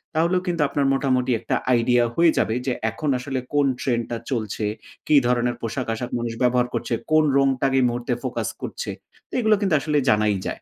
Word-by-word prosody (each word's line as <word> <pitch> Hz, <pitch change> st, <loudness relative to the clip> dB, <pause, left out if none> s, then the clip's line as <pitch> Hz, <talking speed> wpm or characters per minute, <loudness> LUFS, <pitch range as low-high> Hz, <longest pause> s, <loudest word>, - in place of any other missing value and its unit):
তাহলেও 170 Hz, +3 st, +2 dB
কিন্তু 170 Hz, -3 st, 0 dB
আপনার 140 Hz, 0 st, 0 dB
মোটামুটি 130 Hz, -2 st, +1 dB
একটা 115 Hz, -, -2 dB, 0.2 s
আইডিয়া 120 Hz, 0 st, +3 dB
হয়ে 170 Hz, -1 st, +5 dB
যাবে 110 Hz, -, +1 dB
যে 130 Hz, -, 0 dB, 0.2 s
এখন 150 Hz, +7 st, -3 dB
আসলে 130 Hz, +1 st, -3 dB
কোন 145 Hz, -1 st, +3 dB
ট্রেন্ডটা 120 Hz, -2 st, -1 dB
চলছে, 110 Hz, -3 st, -2 dB, 0.4 s
কি 155 Hz, -, +4 dB
ধরনের 120 Hz, 0 st, +1 dB
পোশাক-আশাক 115 Hz, 0 st, -3 dB
মানুষ 120 Hz, -1 st, -3 dB
ব্যবহার 125 Hz, 0 st, +3 dB
করছে, 120 Hz, 0 st, -2 dB, 0.2 s
কোন 155 Hz, 0 st, +5 dB
রংটাকে 135 Hz, -1 st, +2 dB
এই -, -, +3 dB
মুহূর্তে 120 Hz, +1 st, -2 dB
ফোকাস -, -, -2 dB
করছে? -, -, -5 dB, 0.4 s
তো -, -, -23 dB
এগুলা 220 Hz, -3 st, +4 dB
কিন্তু 190 Hz, -6 st, +2 dB
আসলে 150 Hz, +1 st, 0 dB
জানাই 105 Hz, -2 st, +2 dB
যায়। -, -, -5 dB
125 Hz, 180 wpm, -23 LUFS, 120-145 Hz, 0.4 s, হয়ে